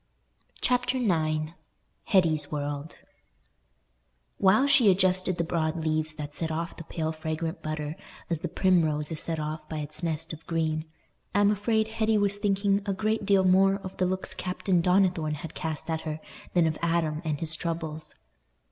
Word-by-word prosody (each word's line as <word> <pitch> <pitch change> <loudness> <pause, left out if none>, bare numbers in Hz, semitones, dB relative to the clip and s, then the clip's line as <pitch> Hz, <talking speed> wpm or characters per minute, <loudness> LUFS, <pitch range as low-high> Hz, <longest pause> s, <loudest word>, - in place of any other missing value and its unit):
Chapter 250 +1 +2
IX 155 -8 +1 0.5
Hetty's 160 -6 +2
World 145 +1 -4 1.4
While 205 +7 +5
she 260 -6 +6
adjusted 185 -1 +3
the 170 - +1
broad 160 -1 -1
leaves 155 0 0
that 145 -1 -6
set 160 +1 -2
off 165 +3 -3
the 165 - -8
pale 160 -1 -3
fragrant 160 +1 -4
butter 155 0 -3 0.3
as 165 -3 -1
the 175 - -3
primrose 160 -5 +2
is 160 - -2
set 165 -1 -2
off 155 0 -5
by 155 - -4
its 150 +2 -4
nest 165 -1 -2
of 160 +1 -10
green 160 -1 0 0.5
I 205 - +5
am 205 0 +5
afraid 220 +1 +1
Hetty 220 -1 +1
was 200 -1 +1
thinking 200 0 +1
a 200 - +1
great 215 +1 -1
deal 195 -2 +5
more 190 +1 +5
of 195 -1 -8
the 185 - +2
looks 185 +1 -2
Captain 180 -1 0
Donnithorne 180 -4 +2
had 155 +2 -8
cast 160 -3 -4
at 160 -1 -1
her 155 -1 -4 0.4
than 175 -2 +5
of 155 -1 -1
Adam 165 -2 0
and 155 -3 -2
his 165 0 +1
troubles. 160 -2 -4
165 Hz, 170 wpm, -28 LUFS, 155-190 Hz, 1.4 s, she